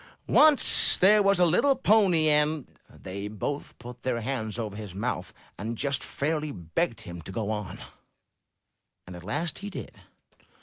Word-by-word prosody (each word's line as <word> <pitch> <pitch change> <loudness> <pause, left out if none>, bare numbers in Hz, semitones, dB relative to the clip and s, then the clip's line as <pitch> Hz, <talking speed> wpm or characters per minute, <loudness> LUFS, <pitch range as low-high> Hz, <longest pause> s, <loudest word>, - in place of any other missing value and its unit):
Once 300 -2 +5
there 210 +3 +5
was 200 -2 +3
a 180 - +5
little 270 - +3
Pony 200 -10 +3
En 150 -1 +1
— - - -39
" - - -35
They 100 +2 -8
both 110 +8 -5
put 125 0 -11
their 120 -2 -2
hands 110 -3 -4
over 110 -4 -5
his 105 -4 -8
mouth, 100 - -3 0.3
and 110 +3 -4
just 140 +1 -1
fairly 150 +1 -3
begged 85 - -3
him 85 -1 -9
to 80 - -9
go 105 +2 -3
on, 105 -3 -5 1.3
and 90 - -10
at 85 - -11
last 145 - -3
he 200 - -6
did. - - -8
130 Hz, 170 wpm, -27 LUFS, 105-170 Hz, 1.3 s, Once